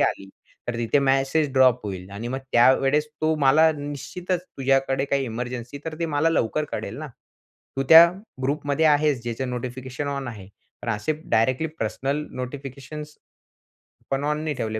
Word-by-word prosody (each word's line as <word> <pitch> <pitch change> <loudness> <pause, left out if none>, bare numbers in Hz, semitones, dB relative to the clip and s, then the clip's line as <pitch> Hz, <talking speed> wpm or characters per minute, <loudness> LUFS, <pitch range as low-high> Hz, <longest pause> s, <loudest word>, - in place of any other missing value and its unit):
आली 95 - 0 0.4
तर 120 - -2
तिथे 120 +5 +2
मॅसेज 135 +2 +2
ड्रॉप 130 -3 +4
होईल 95 -1 -6
आणि 110 +4 -6
मग 130 - -2
त्यावेळेस 135 +5 +4
तो 155 0 +2
मला 150 +3 +5
निश्चितच 155 +5 -4
तुझ्याकडे 135 -3 0
काही 140 -1 0
इमर्जन्सी 125 +3 -5
तर 160 -1 -4
ते 165 - +1
मला 150 +1 +1
लवकर 155 +1 0
कळेल - - -4
ना, 155 - -5 0.7
तू 135 - +1
त्या 165 +1 +11 0.4
ग्रुपमध्ये 145 +3 0
आहेस 145 -4 +3
ज्याचं 120 +2 -3
नोटिफिकेशन 130 +3 -5
ऑन 140 -3 -3
आहे. 100 -5 -9 0.3
पण - - -5
असे 110 +9 -1 0.2
डायरेक्टली 130 +7 +2
पर्सनल 135 +7 -2 0.2
नोटिफिकेशन्स 140 +3 -7 1.0
पण 135 +1 0
ऑन 150 +1 0
नी 155 -2 -1
ठेवले 110 -3 -3
135 Hz, 155 wpm, -24 LUFS, 125-150 Hz, 1.0 s, त्या